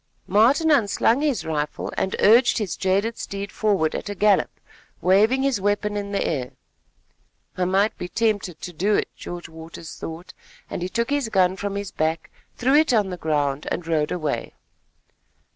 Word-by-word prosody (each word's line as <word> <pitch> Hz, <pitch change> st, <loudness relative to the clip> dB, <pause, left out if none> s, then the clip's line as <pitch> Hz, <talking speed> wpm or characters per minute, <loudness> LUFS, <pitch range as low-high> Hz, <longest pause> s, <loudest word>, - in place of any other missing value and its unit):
Martin 260 Hz, -, +4 dB
unslung 235 Hz, 0 st, +3 dB
his 275 Hz, -, 0 dB
rifle 150 Hz, -2 st, -3 dB
and 190 Hz, -, -1 dB
urged 235 Hz, +4 st, +5 dB
his 210 Hz, -7 st, -2 dB
jaded 200 Hz, +4 st, 0 dB
steed 200 Hz, 0 st, -5 dB
forward 195 Hz, -8 st, +1 dB
at -, -, -4 dB
a 205 Hz, -, -4 dB
gallop, 205 Hz, 0 st, +3 dB, 0.5 s
waving 215 Hz, +8 st, +3 dB
his 265 Hz, -7 st, +1 dB
weapon 205 Hz, +1 st, 0 dB
in 200 Hz, -1 st, -4 dB
the 200 Hz, -, 0 dB
air. 130 Hz, -6 st, -2 dB, 1.0 s
"I 185 Hz, -, 0 dB
might 195 Hz, +4 st, +2 dB
be 180 Hz, -, -4 dB
tempted 205 Hz, -6 st, -1 dB
to 180 Hz, -, -6 dB
do 200 Hz, +6 st, +1 dB
it," -, -, 0 dB
George 175 Hz, -1 st, -7 dB
Waters 160 Hz, 0 st, -10 dB
thought, 165 Hz, +2 st, -8 dB, 0.4 s
and -, -, -4 dB
he 180 Hz, -, -2 dB
took 235 Hz, +5 st, -1 dB
his 285 Hz, -5 st, 0 dB
gun 185 Hz, -3 st, +3 dB
from 200 Hz, 0 st, -4 dB
his 200 Hz, -1 st, -4 dB
back, 160 Hz, +1 st, -2 dB, 0.3 s
threw 255 Hz, +2 st, +2 dB
it 305 Hz, 0 st, +5 dB
on 205 Hz, -4 st, +2 dB
the -, -, -3 dB
ground 145 Hz, -3 st, -1 dB
and 175 Hz, -, -3 dB
rode 155 Hz, -2 st, 0 dB
away. 155 Hz, -9 st, -3 dB
200 Hz, 175 wpm, -23 LUFS, 170-220 Hz, 1.0 s, urged